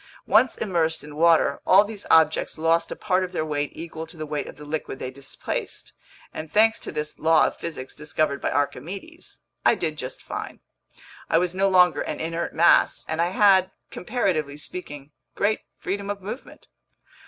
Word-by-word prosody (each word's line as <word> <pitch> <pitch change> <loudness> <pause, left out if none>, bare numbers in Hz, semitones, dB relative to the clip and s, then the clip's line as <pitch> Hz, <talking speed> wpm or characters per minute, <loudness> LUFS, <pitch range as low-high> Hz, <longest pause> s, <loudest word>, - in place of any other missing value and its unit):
Once 255 - +4
immersed 165 -5 0
in 150 0 -10
water, 165 -3 +4
all 195 +3 +6
these 205 -1 -8
objects 160 0 +3
lost 165 +1 +1
a - - -3
part 185 -2 +1
of 185 0 -5
their 155 - -1
weight 145 -1 -2
equal 160 0 -7
to 160 - -11
the 155 - -4
weight 150 -1 -3
of - - -9
the 150 +2 -11
liquid 150 -2 -4
they 130 - -5
displaced, 135 +1 -5 0.4
and 155 -1 -7
thanks 225 +1 +4
to - - -6
this 150 0 -5
law 160 0 +5
of - - -2
physics 140 -6 -6
discovered 150 -1 -1
by - - 0
Archimedes, 190 - -4 0.2
I - - +5
did 155 -6 -3
just 130 +1 -6
fine. - - -6 0.7
I - - +4
was 180 +1 +1
no 195 +1 +2
longer 180 -2 +5
an - - -4
inert 165 +1 -3
mass, 170 +2 +4
and 160 +1 -1
I 170 - +2
had, 190 0 +4 0.2
comparatively 175 - -1
speaking, 145 -3 -7 0.2
great 215 +2 +1 0.2
freedom 200 +1 -4
of 205 -1 -3
movement. 215 +7 -8
165 Hz, 180 wpm, -24 LUFS, 150-190 Hz, 0.7 s, all